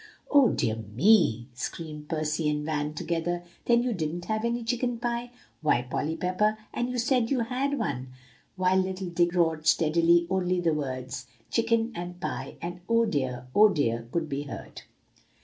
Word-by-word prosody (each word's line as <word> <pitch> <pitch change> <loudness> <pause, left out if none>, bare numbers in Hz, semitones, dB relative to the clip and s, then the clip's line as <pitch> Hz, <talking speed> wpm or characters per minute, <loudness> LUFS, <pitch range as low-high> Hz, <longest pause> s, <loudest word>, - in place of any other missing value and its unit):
"Oh, 280 -4 +7
dear 115 -3 0
me!" 120 - +3
screamed 150 +4 -6
Percy 155 -1 0
and 150 0 -1
Van 150 -1 -2
together; 175 +2 -2 0.2
"then, 235 0 +4
you 245 -1 0
didn't 175 -1 -3
have 220 0 -1
any 235 0 -1
chicken 245 +1 -1
pie. 240 0 -2 0.3
Why, 135 -6 +2
Polly 145 +5 -2
Pepper 210 +4 +1 0.2
And 240 +1 -1
you 250 - -3
said 245 -1 +2
you 265 -3 +1
had 265 +4 -1
one!" 135 - -2 0.5
While 185 0 +2
little 190 -1 -1
Dick 175 0 +2
roared 160 -3 +1
steadily, 170 +2 +4
only 185 -1 +1
the 170 -2 +2
words, 130 -3 -4 0.2
"chicken," 230 0 +2
and 175 -1 -6
"pie," - - -4
and 175 +1 -5
"Oh, 230 0 +4
dear! 130 - -2
oh, 215 +1 +7
dear!" 115 - 0
could 170 -2 -1
be 140 -1 -3
heard. 140 - -8
175 Hz, 165 wpm, -28 LUFS, 150-225 Hz, 0.5 s, Oh